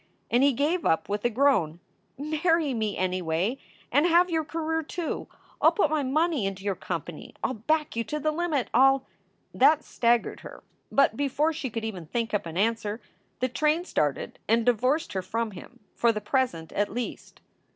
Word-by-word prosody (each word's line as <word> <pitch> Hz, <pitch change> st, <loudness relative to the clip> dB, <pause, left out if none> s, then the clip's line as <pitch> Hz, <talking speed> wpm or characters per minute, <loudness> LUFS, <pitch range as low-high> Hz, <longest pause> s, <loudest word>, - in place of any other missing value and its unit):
And 240 Hz, -, +4 dB
he 280 Hz, +1 st, +5 dB
gave 310 Hz, +7 st, 0 dB
up 160 Hz, 0 st, +1 dB
with 205 Hz, 0 st, -2 dB
a -, -, +4 dB
groan: 215 Hz, -, +2 dB, 0.4 s
"Marry 310 Hz, +1 st, +1 dB
me 215 Hz, -3 st, -2 dB
anyway 185 Hz, +5 st, -1 dB, 0.3 s
and 290 Hz, +6 st, +4 dB
have 350 Hz, +1 st, +4 dB
your 320 Hz, -1 st, +1 dB
career, 320 Hz, +1 st, -2 dB
too. 325 Hz, +2 st, -4 dB, 0.3 s
I -, -, +6 dB
ll -, -, +7 dB
put 350 Hz, -8 st, +2 dB
my 310 Hz, -1 st, +1 dB
money 285 Hz, -, +1 dB
into 195 Hz, 0 st, -6 dB
your 200 Hz, -1 st, 0 dB
company. 170 Hz, -3 st, -6 dB
I -, -, +1 dB
ll -, -, -2 dB
back 305 Hz, +7 st, -1 dB
you 230 Hz, -, 0 dB
to 300 Hz, +8 st, -3 dB
the 310 Hz, +1 st, 0 dB
limit. 305 Hz, -5 st, -1 dB
I 270 Hz, +1 st, +7 dB
ll" 270 Hz, -1 st, -5 dB, 0.5 s
That 310 Hz, -, +4 dB
staggered 235 Hz, -1 st, +1 dB
her, -, -, -11 dB, 0.3 s
but 275 Hz, -5 st, +3 dB
before 285 Hz, +4 st, +1 dB
she 290 Hz, -4 st, -4 dB
could 225 Hz, 0 st, -4 dB
even 185 Hz, -7 st, -6 dB
think 230 Hz, +4 st, -2 dB
up 205 Hz, -4 st, 0 dB
an 165 Hz, +1 st, -6 dB
answer 215 Hz, +1 st, 0 dB, 0.4 s
the 255 Hz, -, +2 dB
train 305 Hz, +6 st, +1 dB
started 145 Hz, -, -1 dB
and 225 Hz, +1 st, +3 dB
divorced 255 Hz, +4 st, +1 dB
her 190 Hz, -, -1 dB
from 220 Hz, +4 st, -2 dB
him 240 Hz, +6 st, -12 dB
for 235 Hz, -, +3 dB
the 215 Hz, -, -3 dB
present, 210 Hz, -, -1 dB
at 205 Hz, 0 st, -1 dB
least. 240 Hz, +3 st, -6 dB
245 Hz, 195 wpm, -27 LUFS, 205-305 Hz, 0.5 s, ll